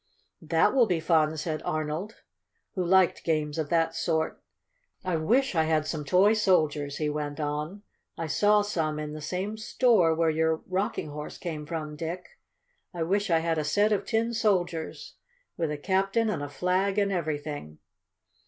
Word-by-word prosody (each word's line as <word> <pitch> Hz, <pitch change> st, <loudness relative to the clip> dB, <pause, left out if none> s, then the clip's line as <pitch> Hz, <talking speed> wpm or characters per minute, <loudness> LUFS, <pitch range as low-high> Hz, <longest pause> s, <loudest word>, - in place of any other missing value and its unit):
"That 165 Hz, +5 st, +2 dB
will 250 Hz, -4 st, +4 dB
be 175 Hz, -4 st, +1 dB
fun!" 160 Hz, -1 st, +2 dB
said 155 Hz, 0 st, -3 dB
Arnold, 155 Hz, +7 st, -4 dB, 0.5 s
who 185 Hz, -, -1 dB
liked 185 Hz, 0 st, +3 dB
games 155 Hz, -1 st, -1 dB
of 150 Hz, -2 st, -2 dB
that 165 Hz, -1 st, +2 dB
sort. 160 Hz, -1 st, -1 dB, 0.6 s
"I 185 Hz, -2 st, -1 dB
wish 235 Hz, +12 st, +2 dB
I 160 Hz, -2 st, +2 dB
had 155 Hz, -1 st, +1 dB
some 155 Hz, -1 st, -3 dB
toy 190 Hz, +7 st, +5 dB
soldiers," 155 Hz, -9 st, +1 dB
he 155 Hz, -, -1 dB
went 150 Hz, 0 st, -3 dB
on. 150 Hz, +7 st, -3 dB, 0.3 s
"I 165 Hz, -, -3 dB
saw 205 Hz, +6 st, +3 dB
some 160 Hz, -7 st, -1 dB
in 150 Hz, 0 st, -5 dB
the 155 Hz, -, -7 dB
same 190 Hz, +7 st, -3 dB
store 215 Hz, -7 st, +3 dB
where 165 Hz, 0 st, +2 dB
your 160 Hz, 0 st, 0 dB
Rocking 190 Hz, -3 st, -2 dB
Horse 150 Hz, +1 st, -7 dB
came 155 Hz, -4 st, -5 dB
from, 155 Hz, -2 st, -4 dB
Dick. 170 Hz, +4 st, -6 dB, 0.6 s
I 170 Hz, -, -1 dB
wish 200 Hz, +4 st, 0 dB
I 165 Hz, -, +4 dB
had 165 Hz, -1 st, +1 dB
a -, -, 0 dB
set 205 Hz, +9 st, +2 dB
of 200 Hz, -2 st, +1 dB
tin 230 Hz, 0 st, 0 dB
soldiers, 180 Hz, -7 st, -1 dB, 0.4 s
with 165 Hz, -2 st, -1 dB
a 150 Hz, -, -3 dB
captain 195 Hz, +7 st, +1 dB
and 175 Hz, -, -3 dB
a 145 Hz, -, -4 dB
flag 185 Hz, +7 st, 0 dB
and 200 Hz, -1 st, +2 dB
everything!" 150 Hz, -, -4 dB
165 Hz, 170 wpm, -27 LUFS, 155-195 Hz, 0.6 s, toy